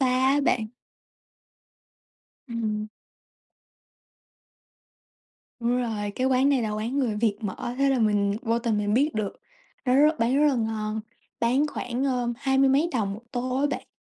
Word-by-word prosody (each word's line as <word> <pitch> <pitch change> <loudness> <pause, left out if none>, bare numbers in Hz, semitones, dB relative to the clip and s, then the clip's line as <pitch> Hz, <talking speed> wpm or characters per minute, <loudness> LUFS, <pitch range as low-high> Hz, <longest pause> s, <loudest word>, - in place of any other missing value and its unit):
xa 265 - +3
á 260 +3 +3
bạn. 225 -5 +1 1.8
Ừm. 215 -2 -2 2.7
Đúng 240 +1 +1
rồi, 215 -4 -2
cái 255 - 0
quán 265 +1 +3
này 270 -4 +2
là 215 - -1
quán 225 +6 -2
người 235 -6 0
Việt 210 -2 +1
mở, 220 +3 -4
thế 275 - +3
là 265 - +2
mình 205 -2 +2
vô 230 -1 +1
tình 230 -3 0
mình 205 0 0
biết 285 +5 +2
được. 215 -2 -2 0.5
Nó 250 - +2
rất 300 +3 +4
bán 235 +3 +2
rất - - +6
là 275 - +2
ngon, 220 -2 -2 0.4
bán 255 +6 +2
khoảng 250 -3 -3
à, 250 -2 0
hai 270 0 0
mươi 270 0 +5
mấy 285 +6 +3
đồng 205 -5 -1
một 215 - -10
tô 255 +1 -2
á 290 - +3
bạn. - - -4
240 Hz, 165 wpm, -26 LUFS, 215-265 Hz, 2.7 s, rất